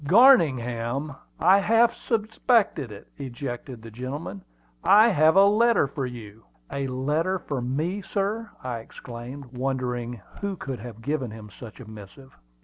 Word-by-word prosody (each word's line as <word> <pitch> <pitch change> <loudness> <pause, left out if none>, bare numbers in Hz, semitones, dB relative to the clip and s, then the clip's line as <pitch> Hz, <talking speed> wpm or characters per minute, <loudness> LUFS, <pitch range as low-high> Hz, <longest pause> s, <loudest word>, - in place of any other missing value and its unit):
"Garningham! 140 - +4 0.2
I 190 +4 +6
half 230 +3 +4
suspected 220 - 0
it!" 100 - -11
ejaculated 125 -2 -6
the 115 - -10
gentleman. 125 - -6 0.4
"I 215 +3 +7
have 160 -4 +4
a 195 +1 +8
letter 225 -1 +4
for 135 -1 -4
you." 110 -3 -10 0.3
"A 140 -1 -2
letter 150 +8 0
for 140 -7 -4
me, 155 +11 -2
sir!" 205 +3 -2
I 125 -2 -3
exclaimed, 125 +3 -10
wondering 125 -2 -2 0.2
who 200 -1 -2
could 135 -8 -6
have 115 0 -10
given 140 -3 -1
him 105 -1 -10
such 110 +1 -11
a 125 - -10
missive. 110 +5 -12
135 Hz, 145 wpm, -25 LUFS, 120-190 Hz, 0.4 s, a